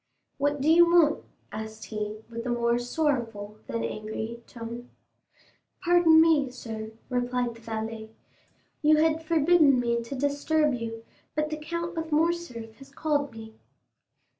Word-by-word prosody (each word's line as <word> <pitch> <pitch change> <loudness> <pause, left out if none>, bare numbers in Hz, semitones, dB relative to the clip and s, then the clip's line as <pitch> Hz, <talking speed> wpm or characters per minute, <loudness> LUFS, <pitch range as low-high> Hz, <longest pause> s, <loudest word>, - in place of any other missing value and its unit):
"What 290 0 0
do 285 - 0
you 340 +2 +7
want?" 335 -3 +4 0.3
asked 220 +1 -7
he, 215 0 -5
with 230 +1 -6
a - - -1
more 235 0 +1
sorrowful 240 -6 -2
than 115 0 -2
angry 220 - -5
tone. 235 +1 -8 0.9
"Pardon 345 -2 +6
me, 315 -4 +4
sir," 220 -3 -7
replied 245 -1 -1
the 230 - -15
valet; 220 -1 -5 0.7
"you 305 -1 +5
had 320 +1 +2
forbidden 315 -4 +4
me 235 -1 0
to 235 +4 -6
disturb 285 +2 +1
you, 225 -1 -5 0.3
but 305 0 0
the 310 - -2
Count 340 +3 -4
of 320 0 -5
Morcerf 300 -9 -1
has 270 - -13
called 285 -1 -1
me." 220 -1 -10
250 Hz, 140 wpm, -27 LUFS, 225-310 Hz, 0.9 s, you